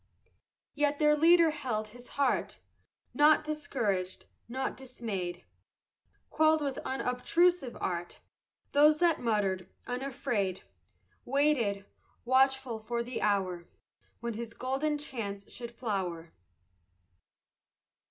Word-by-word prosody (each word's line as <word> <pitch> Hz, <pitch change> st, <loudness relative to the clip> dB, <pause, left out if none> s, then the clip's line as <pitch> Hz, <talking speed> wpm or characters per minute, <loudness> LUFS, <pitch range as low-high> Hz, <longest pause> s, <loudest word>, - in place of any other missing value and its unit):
Yet 290 Hz, 0 st, +1 dB
their 300 Hz, 0 st, +4 dB
leader 330 Hz, +1 st, +6 dB
held 225 Hz, -8 st, -3 dB
his 245 Hz, +3 st, -13 dB
heart, 280 Hz, -3 st, +1 dB, 0.6 s
Naught 305 Hz, +1 st, +5 dB
discouraged, 230 Hz, -12 st, -2 dB, 0.2 s
naught 265 Hz, +2 st, -2 dB
dismayed; 210 Hz, -9 st, -5 dB, 0.9 s
Quelled 315 Hz, 0 st, +4 dB
with 280 Hz, -3 st, -2 dB
unobtrusive 270 Hz, +3 st, +1 dB
art 175 Hz, -1 st, -3 dB, 0.5 s
Those 300 Hz, +1 st, +6 dB
that 340 Hz, -1 st, +3 dB
muttered; 195 Hz, -5 st, 0 dB, 0.2 s
unafraid 245 Hz, -7 st, -2 dB, 0.6 s
Waited, 245 Hz, -8 st, +1 dB, 0.4 s
watchful, 265 Hz, -2 st, +2 dB
for 235 Hz, +2 st, -2 dB
the 245 Hz, +1 st, -5 dB
hour 185 Hz, -4 st, 0 dB, 0.5 s
When 235 Hz, -1 st, -3 dB
his 230 Hz, +1 st, -6 dB
golden 275 Hz, +4 st, -1 dB
chance 215 Hz, -9 st, -5 dB
should 235 Hz, -1 st, -6 dB
flower. 190 Hz, -8 st, -4 dB
245 Hz, 95 wpm, -30 LUFS, 205-290 Hz, 0.9 s, leader